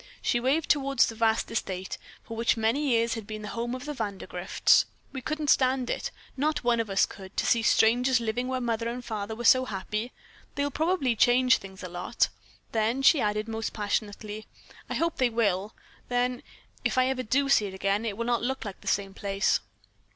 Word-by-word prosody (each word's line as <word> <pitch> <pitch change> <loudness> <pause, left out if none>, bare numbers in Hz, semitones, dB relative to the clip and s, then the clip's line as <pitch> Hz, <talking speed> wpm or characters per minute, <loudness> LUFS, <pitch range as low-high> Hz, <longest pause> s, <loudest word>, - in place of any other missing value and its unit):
She 240 - +1
waved 280 +6 +1
toward 275 -2 +1
the 230 - +4
vast 225 0 +1
estate 190 -4 -3 0.3
which 230 +1 0
for - - -6
many 230 +7 +1
years 230 -1 +2
had 220 -3 -6
been 215 -1 -6
the 210 - -5
home 235 +1 -3
of 255 - -7
Vandergrifts. 220 -10 +1 0.3
"We 265 - -5
couldn't 305 +2 0
stand 260 -1 +2
it, - - -2 0.3
not 300 0 0
one 240 -1 +2
of 225 -2 -1
us 195 0 +3
could, 190 0 -12
to - - +1
see 235 - +3
strangers 245 +3 +4
living 235 +2 -2
where 260 0 -1
Mother 230 -1 -1
and 245 +1 -6
Father 215 -1 -4
were 240 +1 -6
so 255 +2 +6
happy. 215 +2 -4 0.4
They'll 285 0 -1
probably 315 -6 +1
change 250 +3 +5
things 190 0 -11
a - - -4
lot." 180 +6 0 0.4
Then 230 +4 0
she 280 0 +6
added 210 +1 0
almost 225 -1 -3
passionately: 210 0 -3 0.4
"I - - -2
hope 335 0 0
they 255 -2 +3
will. 210 -3 0 0.3
Then, 245 0 0 0.4
if - - 0
ever 255 0 +2
I - - -5
do 275 +5 +1
see 220 -7 +4
it 190 - -8
again, 195 +3 0
it 210 -3 -3
will 235 - -2
not 240 -1 +1
look 260 +1 -2
like 200 -2 -7
the - - -13
same 195 -1 0
place." 195 0 +1
230 Hz, 200 wpm, -28 LUFS, 210-255 Hz, 0.4 s, so